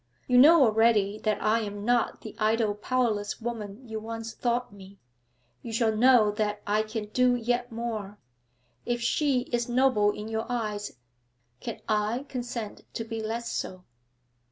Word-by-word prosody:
You 250 Hz, -1 st, +4 dB
know 305 Hz, +3 st, +8 dB
already 215 Hz, -3 st, +3 dB
that 215 Hz, -1 st, 0 dB
I 220 Hz, +2 st, +3 dB
am 205 Hz, -1 st, -5 dB
not 240 Hz, 0 st, +1 dB
the 220 Hz, -, -9 dB
idle 215 Hz, 0 st, +2 dB
powerless 210 Hz, -2 st, -1 dB
woman 225 Hz, 0 st, -6 dB
you 220 Hz, -1 st, -4 dB
once 225 Hz, 0 st, -6 dB
thought 240 Hz, -2 st, -1 dB
me; 195 Hz, 0 st, -13 dB, 0.6 s
you 230 Hz, -, -7 dB
shall 225 Hz, -1 st, +1 dB
know 235 Hz, -2 st, +5 dB
that 210 Hz, 0 st, -2 dB
I 210 Hz, +1 st, +2 dB
can 215 Hz, -1 st, -5 dB
do 250 Hz, +2 st, +3 dB
yet 245 Hz, +1 st, -1 dB
more. 220 Hz, -3 st, -4 dB, 0.7 s
If 240 Hz, 0 st, -1 dB
she 260 Hz, +2 st, +1 dB
is 240 Hz, 0 st, 0 dB
noble 240 Hz, -4 st, +3 dB
in 210 Hz, +1 st, -4 dB
your 225 Hz, 0 st, -3 dB
eyes, 210 Hz, -4 st, -3 dB, 0.7 s
can -, -, -6 dB
I 215 Hz, +5 st, 0 dB
consent 240 Hz, -4 st, -5 dB
to 225 Hz, -, -2 dB
be 225 Hz, 0 st, -5 dB
less 230 Hz, +2 st, -3 dB
so?' 185 Hz, -1 st, -4 dB
225 Hz, 155 wpm, -27 LUFS, 210-240 Hz, 0.7 s, know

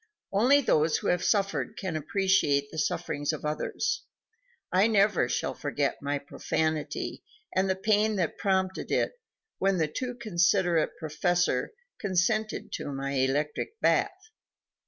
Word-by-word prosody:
Only 255 Hz, +8 st, +5 dB
those 155 Hz, -, +2 dB
who -, -, -2 dB
have 180 Hz, 0 st, +1 dB
suffered 200 Hz, -1 st, 0 dB
can 185 Hz, -5 st, -3 dB
appreciate 155 Hz, -4 st, +1 dB
the 160 Hz, -, -4 dB
sufferings 145 Hz, 0 st, -1 dB
of 155 Hz, -1 st, -6 dB
others. 150 Hz, 0 st, -1 dB, 0.7 s
I 190 Hz, +4 st, +4 dB
never 200 Hz, -, +3 dB
shall -, -, -1 dB
forget 145 Hz, -1 st, -2 dB
my 145 Hz, 0 st, -1 dB
profanity 150 Hz, +1 st, -2 dB, 0.3 s
and 190 Hz, +1 st, +2 dB
the 190 Hz, -, +2 dB
pain 215 Hz, +2 st, +2 dB
that 175 Hz, -5 st, -1 dB
prompted 190 Hz, -1 st, 0 dB
it -, -, +2 dB, 0.5 s
when 195 Hz, 0 st, +2 dB
the 160 Hz, -2 st, +1 dB
too 245 Hz, +11 st, -4 dB
considerate 180 Hz, -6 st, +1 dB
Prof. 160 Hz, -2 st, 0 dB, 0.3 s
consented 215 Hz, +3 st, 0 dB
to -, -, -4 dB
my 140 Hz, 0 st, -3 dB
electric 145 Hz, -, -1 dB
bath. 405 Hz, +2 st, +1 dB
180 Hz, 135 wpm, -28 LUFS, 150-200 Hz, 0.7 s, Only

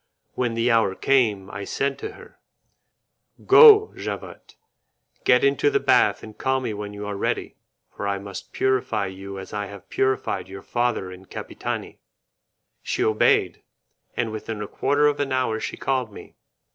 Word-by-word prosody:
When 120 Hz, -2 st, -1 dB
the 115 Hz, +2 st, +2 dB
hour 110 Hz, -4 st, +2 dB
came, 110 Hz, -8 st, +1 dB
I 100 Hz, +1 st, -6 dB
said 140 Hz, +5 st, -2 dB
to -, -, -6 dB
her, -, -, -16 dB, 1.1 s
"Go, 430 Hz, -2 st, +8 dB
Javotte, -, -, -7 dB, 0.7 s
get -, -, +5 dB
into 410 Hz, +1 st, +3 dB
the 415 Hz, -1 st, +2 dB
bath -, -, +3 dB
and 110 Hz, -1 st, -10 dB
call 130 Hz, 0 st, 0 dB
me 120 Hz, -4 st, -3 dB
when 105 Hz, 0 st, -6 dB
you 105 Hz, 0 st, -7 dB
are 105 Hz, 0 st, -4 dB
ready, 100 Hz, -, -2 dB, 0.4 s
for 100 Hz, -, -4 dB
I 100 Hz, 0 st, 0 dB
must 100 Hz, 0 st, -9 dB
purify 125 Hz, -5 st, 0 dB
you 95 Hz, +1 st, -7 dB
as 95 Hz, +2 st, -9 dB
I 105 Hz, -1 st, -3 dB
have 100 Hz, -1 st, -12 dB
purified 130 Hz, -8 st, 0 dB
your 95 Hz, 0 st, -9 dB
father 120 Hz, -6 st, -1 dB
and 90 Hz, +1 st, -13 dB
Capitani." -, -, -6 dB, 0.8 s
She -, -, -1 dB
obeyed, 110 Hz, -1 st, +2 dB, 0.6 s
and 115 Hz, -2 st, -1 dB
within 110 Hz, 0 st, -5 dB
a -, -, -6 dB
quarter 145 Hz, +6 st, +1 dB
of 145 Hz, -1 st, +2 dB
an 140 Hz, -1 st, -1 dB
hour 130 Hz, -4 st, 0 dB
she -, -, -5 dB
called 130 Hz, -4 st, -1 dB
me. -, -, -12 dB
110 Hz, 165 wpm, -24 LUFS, 100-130 Hz, 1.1 s, Go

